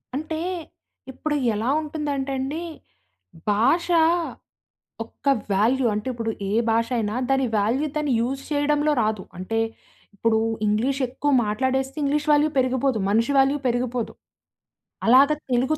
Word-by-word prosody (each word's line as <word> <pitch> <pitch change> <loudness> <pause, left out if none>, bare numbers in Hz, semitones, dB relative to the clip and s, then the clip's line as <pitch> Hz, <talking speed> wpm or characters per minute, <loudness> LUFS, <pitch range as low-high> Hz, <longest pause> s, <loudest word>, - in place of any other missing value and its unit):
అంటే, 315 +2 -3 0.7
ఇప్పుడు 295 +3 -3 0.2
ఎలా 225 +4 -1
ఉంటుందంటండి, 285 0 -3 0.9
భాష 265 - +2 1.2
ఒక్క 230 +4 -12 0.3
వాల్యూ, 240 +6 +2
అంటే 210 +4 -3
ఇప్పుడు 230 -2 -3 0.2
ఏ - - -2 0.2
భాషయినా, 230 -1 0
దాని 270 -1 +2
వాల్యూ 245 +9 +1
దాన్ని 295 -3 0
యూజ్ 265 +3 -2
చేయడంలో 295 +1 +2
రాదు. 215 -3 -1
అంటే 225 +5 -2 0.6
ఇప్పుడు, 220 +2 +2 0.3
ఇంగ్లీష్ 255 +7 0
ఎక్కువ 285 +4 -2
మాట్లాడేస్తే, 260 +5 -1
ఇంగ్లీష్ 295 +2 0
వాల్యూ 295 +1 +3
పెరిగిపోదు, 260 -2 +1
మనిషి 230 +7 +2
వాల్యూ 270 +2 +3
పెరిగిపోదు. 245 -1 -1 0.9
అలాగ 265 +5 +7 0.2
తెలుగు, 255 +5 +1
260 Hz, 115 wpm, -23 LUFS, 230-285 Hz, 1.2 s, అలాగ